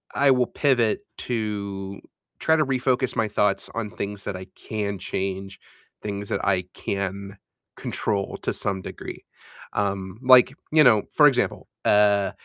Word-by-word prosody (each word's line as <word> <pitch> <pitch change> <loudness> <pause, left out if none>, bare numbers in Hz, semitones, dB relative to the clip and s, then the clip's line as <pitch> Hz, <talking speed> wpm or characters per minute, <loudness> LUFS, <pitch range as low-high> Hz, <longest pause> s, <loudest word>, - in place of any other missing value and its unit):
I 140 -1 +5
will 125 -2 +3
pivot 125 - +2 0.2
to 100 -4 -3 0.4
try 160 - +3
to 155 -2 +2
refocus 130 -1 0
my 110 -2 +1
thoughts 100 -1 0
on 110 -3 -3
things 100 0 -5
that 95 - -4
I 95 0 -8
can 100 -2 -3
change, 95 +1 -4 0.4
things 100 -1 -5
that - - -1
I 95 -2 +2
can 100 0 -4 0.4
control 100 -2 -2
to - - -2
some 95 -2 -2
degree. - - -8 0.5
Um, 95 -1 -2
like, 130 +1 +7 0.2
you 155 -1 +6
know, 110 -5 +6
for 150 -1 +8
example, 125 -3 0 0.2
uh 100 -1 +4
105 Hz, 145 wpm, -24 LUFS, 100-125 Hz, 0.5 s, for